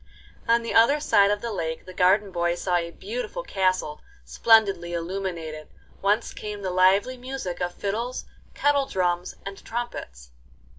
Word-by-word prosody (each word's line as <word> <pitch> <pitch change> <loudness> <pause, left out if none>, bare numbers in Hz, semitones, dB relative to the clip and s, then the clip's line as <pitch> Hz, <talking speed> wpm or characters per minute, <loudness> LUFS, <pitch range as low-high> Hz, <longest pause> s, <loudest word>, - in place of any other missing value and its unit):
On 230 0 +3
the 230 - -3
other 235 +7 +5
side 200 -9 +4
of 205 0 0
the 235 - -3
lake 160 -4 -4
the 185 - -10
garden 190 +3 +3
boy 175 -1 0
saw 175 0 0
a 170 -1 -2
beautiful 465 - -5
castle 185 - 0 0.2
splendidly 195 - +3
illuminated, 170 -3 -4 0.3
whence 205 +4 +1
came 210 -1 -6
the 185 - -2
lively 195 +7 +3
music 250 -9 -5
of 175 0 -2
fiddles, 230 +5 -3 0.3
kettle 285 -1 +2
drums, 180 -1 -1
and 195 0 -8
trumpets. 60 - -6
195 Hz, 150 wpm, -25 LUFS, 175-230 Hz, 0.3 s, other